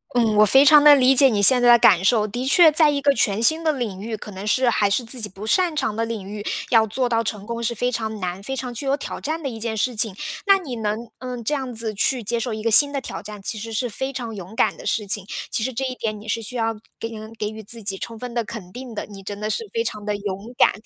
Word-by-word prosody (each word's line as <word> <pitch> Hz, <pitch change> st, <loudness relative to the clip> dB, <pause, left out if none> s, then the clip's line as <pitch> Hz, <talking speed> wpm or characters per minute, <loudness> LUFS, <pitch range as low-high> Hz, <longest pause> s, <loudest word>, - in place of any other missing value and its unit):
嗯， 225 Hz, -3 st, +2 dB
我 215 Hz, -, +7 dB
非 265 Hz, +7 st, +5 dB
常 295 Hz, +1 st, +7 dB
地 295 Hz, -1 st, +9 dB
理 265 Hz, -1 st, +4 dB
解 270 Hz, 0 st, +7 dB
你 215 Hz, -4 st, 0 dB
现 245 Hz, +5 st, +7 dB
在 245 Hz, -, +5 dB
的 240 Hz, -, +8 dB
感 185 Hz, -5 st, +5 dB
受， 215 Hz, +1 st, +3 dB
的 240 Hz, +5 st, -4 dB
确 315 Hz, +4 st, +6 dB
在 310 Hz, 0 st, +4 dB
一 285 Hz, -1 st, 0 dB
个 280 Hz, 0 st, +3 dB
全 220 Hz, -2 st, 0 dB
新 315 Hz, +5 st, +3 dB
的 315 Hz, -, +2 dB
领 225 Hz, -9 st, -4 dB
域， 220 Hz, +1 st, -5 dB
可 210 Hz, -, -10 dB
能 190 Hz, +1 st, -8 dB
是 255 Hz, +4 st, +2 dB
还 210 Hz, -4 st, +2 dB
是 220 Hz, +5 st, +1 dB
自 235 Hz, +1 st, -6 dB
己 210 Hz, -, -1 dB
不 195 Hz, +3 st, -10 dB
擅 350 Hz, -, +2 dB
长 220 Hz, -8 st, -1 dB
的 225 Hz, -, -1 dB
领 220 Hz, -4 st, -5 dB
域， 205 Hz, 0 st, -7 dB, 0.3 s
要 220 Hz, -2 st, +5 dB
做 250 Hz, +4 st, -1 dB
到 230 Hz, -1 st, 0 dB
成 210 Hz, -2 st, -4 dB
功 235 Hz, +1 st, -5 dB
是 235 Hz, +1 st, -1 dB
非 245 Hz, +3 st, -1 dB
常 220 Hz, -2 st, -4 dB
难、 180 Hz, 0 st, -4 dB
非 265 Hz, +7 st, -4 dB
常 250 Hz, -2 st, -5 dB
具 270 Hz, +4 st, -6 dB
有 275 Hz, -, +1 dB
挑 -, -, -7 dB
战 315 Hz, +2 st, -3 dB
的 -, -, -2 dB
一 225 Hz, -2 st, -8 dB
件 220 Hz, -1 st, -3 dB
事 245 Hz, +3 st, 0 dB
情。 210 Hz, -3 st, 0 dB, 0.3 s
那 395 Hz, -1 st, +6 dB
你 275 Hz, -11 st, -7 dB
能， 220 Hz, +2 st, -4 dB
嗯， 250 Hz, -1 st, -6 dB
这 295 Hz, -, -1 dB
样 265 Hz, -3 st, -3 dB
子 220 Hz, -1 st, -3 dB
去 245 Hz, +4 st, 0 dB
接 235 Hz, +3 st, -1 dB
受 235 Hz, +1 st, -3 dB
一 215 Hz, -, -7 dB
个 230 Hz, -, +1 dB
新 285 Hz, +6 st, +6 dB
的 280 Hz, -, -2 dB
挑 -, -, -7 dB
战， 210 Hz, 0 st, -9 dB
其 210 Hz, +2 st, -4 dB
实 225 Hz, +1 st, -7 dB
是 245 Hz, +3 st, -1 dB
非 265 Hz, +5 st, -4 dB
常 240 Hz, -4 st, -6 dB
勇 190 Hz, +2 st, -9 dB
敢 -, -, +1 dB
的 -, -, -12 dB
事 210 Hz, -, -1 dB
情， 195 Hz, 0 st, -1 dB, 0.2 s
其 -, -, -1 dB
实 260 Hz, -, -1 dB
这 265 Hz, +3 st, -3 dB
一 255 Hz, -, -3 dB
点 215 Hz, -3 st, -4 dB
你 215 Hz, -, -13 dB
是 230 Hz, +2 st, -1 dB
需 240 Hz, +3 st, -5 dB
要 225 Hz, -1 st, 0 dB, 0.3 s
给 225 Hz, -, -5 dB, 0.3 s
给 210 Hz, -, -2 dB
予 220 Hz, 0 st, -9 dB
自 225 Hz, +2 st, -6 dB
己 195 Hz, -1 st, -1 dB
充 230 Hz, -1 st, -7 dB
分 245 Hz, +1 st, -7 dB
的 235 Hz, -1 st, -1 dB
肯 200 Hz, -5 st, -9 dB
定 250 Hz, 0 st, -9 dB
的， -, -, -4 dB
你 200 Hz, -2 st, -12 dB
真 200 Hz, +1 st, -7 dB
的 210 Hz, -, -3 dB
是 220 Hz, -, -2 dB
非 460 Hz, -1 st, -1 dB
常 210 Hz, -, -5 dB
地 210 Hz, 0 st, -2 dB
勇 200 Hz, +2 st, -6 dB
敢。 -, -, +5 dB
230 Hz, 320 characters per minute, -22 LUFS, 210-255 Hz, 0.3 s, 地